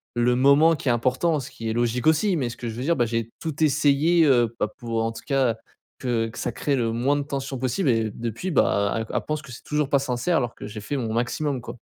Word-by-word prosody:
le 120 +1 +2
moment 140 +5 +5
qui 145 - -7
est - - +5
important 130 +7 +1
ce 135 - -7
qui 115 -1 -5
est 110 - -1
logique 120 +2 0
aussi. 175 +5 +3
Mais 125 -4 -1
ce 115 - -9
que 120 - -5
je 110 - -6
veux 125 - -4
dire, 165 +4 +2
bah, 120 - +2
j'ai 115 0 -2
tout 160 -1 -2
essayé, 155 +3 +3
heu, 120 -5 +3
bah, - - +1
pour 115 -1 -2
en 115 - -1
tout 115 - -10
cas, 135 -5 +2 0.4
que 115 -3 0
que - - -12
ça 120 - -2
crée 140 +4 -1
le 115 -3 0
moins 125 +5 +1
de 145 - 0
tension 135 -1 -4
possible 130 +5 0
et 115 -2 +2
depuis, 115 - -4
bah, 100 -7 +2
elle 110 - -2
elle - - +1
pense 155 0 -2
que 140 -5 -12
c'est 115 - -10
toujours 150 -2 -1
pas 140 - +3
sincère 135 +6 0
alors 120 -3 -1
que - - -8
j'ai 105 0 -7
fait 145 +7 -3
mon 115 -4 -2
maximum 125 +3 -1
quoi. 125 - -8
125 Hz, 265 wpm, -24 LUFS, 115-145 Hz, 0.4 s, moment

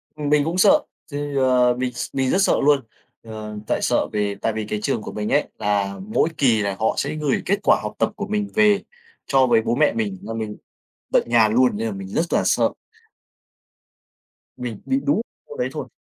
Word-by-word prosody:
Ừm, 145 -1 -3
mình 150 -1 +4
cũng 165 +4 -2
sợ, 290 +10 +5 0.3
thì, 145 0 -4
ờ, 125 -2 +3
mình 125 -1 -2
s - - -4
mình 130 -1 +1
rất 190 - +2
sợ - - +4
luôn. 145 0 +4 0.4
Ờ, 110 -1 -7
tại - - 0
sợ - - +1
về 105 -1 -1
tại 115 - 0
vì 110 -1 -3
cái 105 0 -3
trường 120 -4 -1
của - - -7
mình 105 0 -3
ấy, - - +2
là 100 -1 -1
mỗi 215 -6 +1
kỳ 120 -6 +3
là 100 -1 -1
họ 110 - +1
sẽ 140 +2 -1
gửi 150 -3 0
kết 200 +2 +1
quả - - +4
học - - -4
tập - - +2
của 205 -1 -5
mình 210 -1 -1
về 210 -2 +5 0.5
cho 135 -2 +4
với 115 -2 +4
bố 115 - -1
mẹ 150 +2 +3
mình, 105 -4 -2
là 115 - -5
mình 110 -2 -5 0.6
tận - - +4
nhà 115 -2 +5
luôn, 120 0 +2
nên 115 +1 -2
là 105 - -3
mình 95 -1 -7
rất 165 - -1
là - - +3
sợ. - - +2 1.9
Mình 120 -4 -6
bị 270 - +1
đú 280 -6 +2 0.3
môn 460 +1 -10
đấy - - 0
thôi. - - -6
125 Hz, 220 wpm, -22 LUFS, 110-150 Hz, 1.9 s, sợ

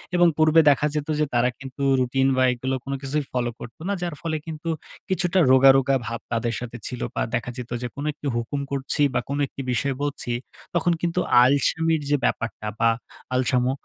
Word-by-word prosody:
এবং 175 0 +6
পূর্বে 155 +1 +6
দেখা 145 +1 +3
যেত 150 0 -2
যে 150 - +3
তারা 120 +1 +3
কিন্তু 135 +1 -9 0.2
রুটিন 130 +1 +2
বা, 130 - +4
এগুলো 130 +2 -2
কোন 140 - -4
কিছুই 140 +1 -2
ফলো 120 -1 0
করতো 120 +6 -10
না। 200 - 0
যার 175 -3 -3
ফলে 160 -2 -1
কিন্তু, 160 +1 -5 0.4
কিছুটা 185 0 +1
রোগা, 130 +1 +7
রোগা 135 0 +2
ভাব 115 -1 -3
তাদের 115 0 0
সাথে 120 -1 -7
ছিল 125 - -6
বা, - - 0
দেখা 120 +1 -2
যেত 125 -1 -7
যে 125 - -2
কোনো 145 +2 -4
একটি 145 0 -7
হুকুম 120 +5 -2
করছি 140 +1 -2
বা, - - +2
কোন 140 - -1 0.3
বিষয় 135 +2 0
বলছি, 145 -4 -3 0.4
তখন 175 +1 +2
কিন্তু 175 +1 0 0.2
আলসামির 155 +4 +2
যে 145 - +4
ব্যাপারটা 110 -2 -2
বা, 115 - +4 0.5
আলসামো, 125 0 +2
135 Hz, 190 wpm, -24 LUFS, 125-155 Hz, 0.5 s, রোগা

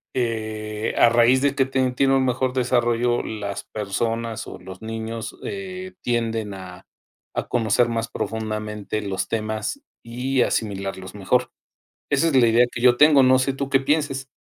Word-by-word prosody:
eh, 110 -3 -2
a 120 - +7
raíz 120 +2 +4
de 140 -1 +3
que 135 -2 +3
te 130 -1 0
tiene 135 +2 +2
un 130 - +2
mejor 130 0 0
desarrollo, 120 -1 +1
las 100 -2 -5
personas 115 +2 -3
o - - -8
los 95 +2 -11
niños, 110 0 -5
eh, 185 -1 -6
tienden 115 -3 -1
a 90 0 -10 0.5
a - - -2
conocer 115 0 +2
más 115 0 -1
profundamente 110 -1 -3
los 100 -2 -3
temas 110 - -3 0.2
y 125 +3 -1
asimilarlos 95 -5 -2
mejor. 95 -2 +1 0.6
Esa 145 +3 +2
es 155 - +1
la 120 - +6
idea 115 +2 +5
que 115 - -5
yo 125 -1 +6
tengo. 150 -1 +7
No 130 0 +6
sé 135 +1 +1
tú 135 0 -4
qué 135 -1 +4
pienses. 140 -2 0
115 Hz, 160 wpm, -23 LUFS, 110-130 Hz, 0.6 s, a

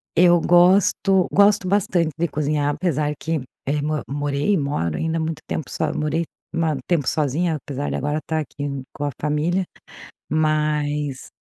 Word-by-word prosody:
Eu 175 0 +6
gosto, 185 +2 +4
gosto 200 -1 +4
bastante 180 -4 +1
de 170 +1 0
cozinhar, 145 0 0
apesar 155 -5 0
que, 160 -2 -2 0.2
eh, 145 +2 0
mo 155 0 -1
morei, 145 +6 0
moro 140 - -1
ainda 160 0 -1
há - - -1
muito 160 -1 -3
tempo, 160 - -2
só 155 -2 -1
morei 155 +2 -1 0.3
ma 165 -2 +1
um 140 - -3
tempo 165 -7 +1
sozinha, 155 +3 +1
apesar 145 -1 -4
de - - -2
agora 150 +3 -1
estar 160 0 -2
aqui 140 -2 -5
com 145 - -4
a - - 0
família. 155 +5 0 0.6
Mas, 150 -2 0
155 Hz, 165 wpm, -22 LUFS, 145-170 Hz, 0.6 s, Eu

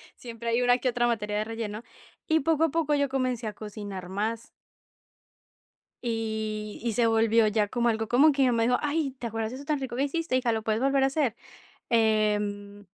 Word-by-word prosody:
Siempre 235 -1 -6
hay 235 +2 +2
una, 245 0 +4
que 255 - 0
otra 240 0 +1
materia 210 -3 -1
de - - 0
relleno. 225 0 -5 0.4
Y 320 -1 +3
poco 320 +2 +2
a - - 0
poco, 305 -1 0
yo 280 -1 +1
comencé 255 -4 -1
a 210 - -4
cocinar 205 -3 -7
más. 220 +4 -3 1.6
Y 220 -2 -3
y 235 -2 -1
se 235 -1 +3
volvió 225 0 +3
ya, 210 -1 +1
como 240 0 0
algo, 225 -1 -1
como 290 +5 +5
que 275 0 +1
ella 255 - +4
me 230 -1 +2
dijo: 245 +1 +3
"Ay, 295 -2 -1
¿te 235 - -3
acuerdas, 225 +1 -3
de - - -6
eso 280 - -9
tan 295 0 0
rico 260 -3 -5
que 265 - 0
hiciste, 285 -1 -1
hija? 250 -2 +1
¿Lo 220 -1 -1
puedes 220 +1 0
volver 275 0 +3
a - - +5
hacer?" 270 -5 0 0.5
Em, 210 -2 +1
230 Hz, 210 wpm, -27 LUFS, 215-265 Hz, 1.6 s, como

